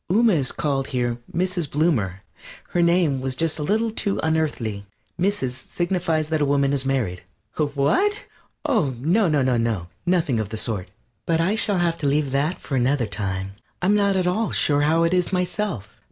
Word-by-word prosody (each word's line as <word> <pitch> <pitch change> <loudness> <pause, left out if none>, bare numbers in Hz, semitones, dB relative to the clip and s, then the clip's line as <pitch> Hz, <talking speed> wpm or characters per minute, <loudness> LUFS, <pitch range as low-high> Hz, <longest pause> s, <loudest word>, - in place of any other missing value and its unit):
Ooma 225 +2 +4
is 140 -7 0
called 135 -3 -1
here 120 -1 -1
Mrs. 180 -3 -1
Bloomer. 115 - 0 0.5
Her 175 - -1
own 170 - +5
name 170 -6 +2
was 130 -1 -2
just 165 +2 0
a - - -2
little 220 +8 +1
too 200 -2 -1
unearthly. 135 -11 -1 0.3
Mrs. 180 -9 0
signifies 165 +2 -2
that 160 -1 0
a - - +4
woman 140 0 +2
is 135 -1 0
married. 110 -10 -1 0.3
What? 150 - +1 0.4
Oh, 155 - +1
no, 175 - +2
no, 150 -3 +2
no, 115 -8 0 0.2
nothing 165 -10 +2
of 110 -2 -3
the 110 - -5
sort. 105 -5 -3 0.4
But 165 -1 +2
I 175 +5 +2
shall 210 -2 +3
have 170 -1 0
to 145 - -1
leave 140 -1 +1
that 145 +6 0
for 135 - -4
another 130 0 +2
time. 95 -1 -3 0.3
I'm 190 - +2
not 200 -1 +3
at 185 -1 +1
all 210 +5 +1
sure 145 -1 +2
how 160 +3 +3
it 165 +1 +2
is 180 -1 +1
myself. 180 - -2
150 Hz, 185 wpm, -23 LUFS, 130-180 Hz, 0.5 s, own